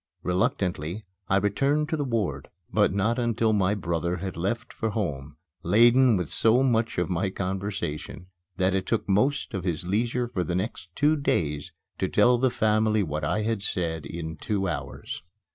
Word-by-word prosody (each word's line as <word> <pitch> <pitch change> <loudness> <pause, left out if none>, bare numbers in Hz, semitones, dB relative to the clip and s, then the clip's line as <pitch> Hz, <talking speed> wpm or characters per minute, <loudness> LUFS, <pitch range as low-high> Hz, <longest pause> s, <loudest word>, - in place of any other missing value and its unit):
Reluctantly 90 +1 -1 0.2
I 95 - +3
returned 140 +9 +1
to 160 - 0
the 150 - -1
ward; 115 -7 -2 0.2
but - - +4
not 105 +5 +1
until 115 -2 +1
my 100 0 +2
brother 85 -2 -1
had 95 0 -5
left 110 +7 -3
for 110 - -2
home, 75 -10 -3 0.3
laden 120 +1 +5
with 90 -4 -3
so 115 +4 +4
much 115 -3 +1
of 90 -1 +1
my 95 +1 0
conversation 95 -4 -4 0.3
that 95 0 +2
it 95 -1 -1
took 115 - 0
most 130 +7 +1
of 95 -4 -3
his 85 -2 -2
leisure 120 +6 0
for 105 -7 -2
the 85 +1 -2
next 95 -2 -3
two 150 +2 +3
days 75 - -1 0.3
to - - +1
tell 125 0 +4
the 130 +1 +3
family 110 -2 +2
what 75 -2 -3
I 105 +8 0
had 110 -2 -1
said 80 -6 -2
in 80 0 -6
two 100 +3 -1
hours. 75 -4 -5
100 Hz, 175 wpm, -26 LUFS, 90-115 Hz, 0.3 s, laden